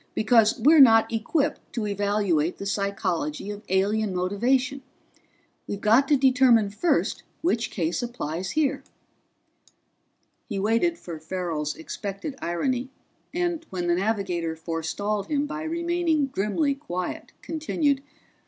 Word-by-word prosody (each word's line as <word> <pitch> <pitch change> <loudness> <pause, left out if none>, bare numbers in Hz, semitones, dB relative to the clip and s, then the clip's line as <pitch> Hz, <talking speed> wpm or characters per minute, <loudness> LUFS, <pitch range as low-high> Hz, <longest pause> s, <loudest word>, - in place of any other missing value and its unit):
"Because 225 +1 +4
we're 300 +7 +6
not 225 -3 +6
equipped 285 +7 0
to 230 -3 -2
evaluate 200 -5 0
the 200 - -6
psychology 200 -4 -2
of 205 0 -7
alien 200 +1 +1
motivation. 250 +9 +1 0.9
We've 200 - -4
got 225 +7 +4
to 290 - +4
determine 255 -5 +4
first 335 +12 0 0.2
which 235 -9 +1
case 170 +3 -1
applies 190 -7 -4
here." 285 -3 +1 1.7
He 205 - -3
waited 230 - +1
for 170 - -8
Farrell's 160 -3 -3
expected 200 - -6
irony, 250 +9 -1 0.4
and 345 -2 -1
when 180 -2 -3
the 175 - +2
navigator 180 -4 -1
forestalled 165 +6 -3
him 290 -1 0
by 305 +1 -5
remaining 335 -1 0
grimly 215 +9 +1
quiet, 185 -11 -5
continued. 305 -3 0
215 Hz, 120 wpm, -25 LUFS, 185-275 Hz, 1.7 s, we're